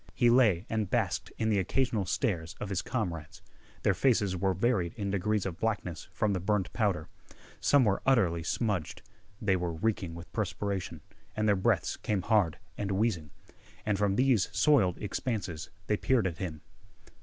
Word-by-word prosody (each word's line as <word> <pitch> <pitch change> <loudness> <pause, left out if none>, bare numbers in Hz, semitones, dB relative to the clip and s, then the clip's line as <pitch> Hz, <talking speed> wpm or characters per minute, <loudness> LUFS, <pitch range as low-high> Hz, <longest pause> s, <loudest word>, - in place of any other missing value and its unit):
He 120 -1 +4
lay 110 -8 +4
and 110 -3 -1
basked - - 0
in 110 - 0
the 105 -2 +3
occasional 110 0 0
stares 90 - -1
of 105 - -4
his 95 -1 -1
comrades. 85 - -4 0.4
Their 100 - +4
faces 100 -2 +2
were 95 +1 0
varied 95 -4 +1
in 100 -2 -3
degrees 100 +1 0
of 95 -2 -4
blackness 105 -6 -2
from 105 -1 0
the 95 - 0
burned 95 +1 0
powder. 100 -9 0 0.5
Some 140 -3 +4
were 100 -2 +1
utterly 95 -11 +3
smudged. 100 -1 -2 0.4
They 95 -3 +2
were 90 -2 -2
reeking 95 -2 -1
with 85 +1 -11
perspiration, 100 -5 -3 0.3
and 110 0 +1
their 105 - +5
breaths 95 - +1
came 100 -4 -1
hard 100 -7 +2 0.2
and 100 -1 -1
wheezing. 95 -7 0 0.6
And 105 -2 0
from 100 -1 +2
these 125 -5 +3
soiled 115 - +3
expanses 100 -7 -3 0.2
they 105 - +1
peered 125 -3 +2
at 85 -4 -2
him. 80 -5 -4
100 Hz, 165 wpm, -30 LUFS, 90-110 Hz, 0.6 s, their